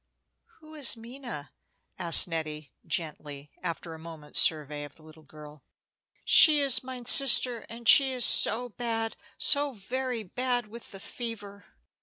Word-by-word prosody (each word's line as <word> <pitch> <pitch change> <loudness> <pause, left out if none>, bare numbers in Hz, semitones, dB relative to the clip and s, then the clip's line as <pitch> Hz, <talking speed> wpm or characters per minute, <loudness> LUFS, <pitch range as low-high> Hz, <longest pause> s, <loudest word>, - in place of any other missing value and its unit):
"Who 310 0 -17
is 285 -6 -2
Minna?" 235 - -10 0.5
asked 170 -1 +5
Nettie, 155 -3 -7
gently, 150 -5 -6
after 170 -1 -7
a 160 - -12
moment's 160 -2 -3
survey 150 -2 -1
of 145 -1 -13
the 160 - -17
little 155 0 -18
girl. 150 -1 -16 0.6
"She 305 -2 +6
is 270 -3 0
mine 255 -1 -10
sister, 250 -2 +4
and 230 0 -10
she 270 +1 +6
is 250 -2 -1
so 245 +3 +3
bad, 225 -1 -5 0.2
so 285 -1 +2
very 245 +2 -6
bad, 245 +4 -3
with 235 +2 -13
the 195 - -12
fever. 205 -3 -10
225 Hz, 145 wpm, -26 LUFS, 160-250 Hz, 0.6 s, She